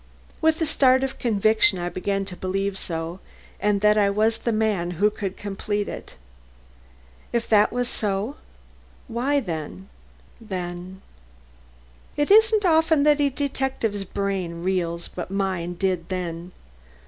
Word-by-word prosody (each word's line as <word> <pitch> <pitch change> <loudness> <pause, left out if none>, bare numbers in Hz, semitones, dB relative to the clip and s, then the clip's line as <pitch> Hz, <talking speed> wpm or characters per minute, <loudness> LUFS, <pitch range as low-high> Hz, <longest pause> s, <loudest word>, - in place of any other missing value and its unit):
With 320 0 +3
a 325 - +1
start 260 -3 +4
of 270 - -3
conviction 220 +2 +3
I 175 0 -3
began 195 +3 -2
to 185 - -7
believe 195 +2 -2
so 165 -1 -4 0.4
and 205 0 +1
that 210 0 +5
I 200 -1 +4
was 215 +3 +1
the 235 - -1
man 215 -5 0
who 210 +3 +3
could 195 -2 -5
complete 205 +1 -3
it. - - -8 1.2
If 235 -1 -1
that 210 -1 +5
was 245 0 -1
so 210 +5 -2 0.7
why, 260 +4 +1
then 155 - -6 0.5
then 185 -2 -6 1.1
It 290 +5 +1
isn't 435 -1 +6
often 320 -3 +4
that 295 0 +4
a 285 - +3
detective's 265 -6 -2
brain 190 -3 -3
reels 170 -2 -1
but 180 0 -6
mine 190 -3 -2
did 180 -2 -1
then. 175 -1 -4
200 Hz, 135 wpm, -24 LUFS, 185-245 Hz, 1.2 s, isn't